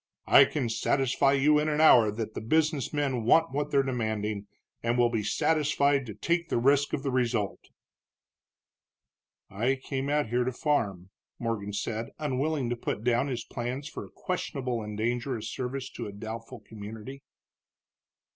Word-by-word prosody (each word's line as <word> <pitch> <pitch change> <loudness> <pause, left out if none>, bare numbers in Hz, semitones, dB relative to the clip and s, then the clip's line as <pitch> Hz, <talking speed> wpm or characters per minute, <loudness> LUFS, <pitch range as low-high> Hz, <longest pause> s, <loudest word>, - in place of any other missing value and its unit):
"I - - +8
can 135 -5 -2
satisfy 135 +4 +2
you 150 +2 +4
in 155 +1 0
an 150 0 0
hour 120 -8 +7
that 110 0 -5
the - - -5
business 150 +2 +1
men 140 -5 -1
want 160 +6 +4
what 145 +2 -2
they're 140 -1 +3
demanding, 110 -5 -2 0.3
and 120 +1 0
will 120 -1 +3
be 115 -2 0
satisfied 140 +3 +1
to 105 - -7
take 170 +9 -1
the - - +1
risk 140 +4 +3
of 135 - -1
the 135 - -1
result." 120 -5 -1 1.8
"I 115 +7 +1
came 135 +1 -4
out 145 -5 +1
here 125 +2 +1
to 130 - -1
farm," 100 - -1 0.3
Morgan 110 -4 -3
said, 110 +2 -3
unwilling 145 -1 -1
to - - 0
put 115 -2 -4
down 120 +3 +2
his 120 -4 -3
plans 125 +4 -4
for - - -7
a - - -12
questionable 130 -9 -3
and 105 -1 -6
dangerous 120 0 -2
service 130 +1 -4
to 115 - -6
a - - -6
doubtful 115 +3 -7
community. 110 +5 -9
125 Hz, 165 wpm, -28 LUFS, 110-140 Hz, 1.8 s, I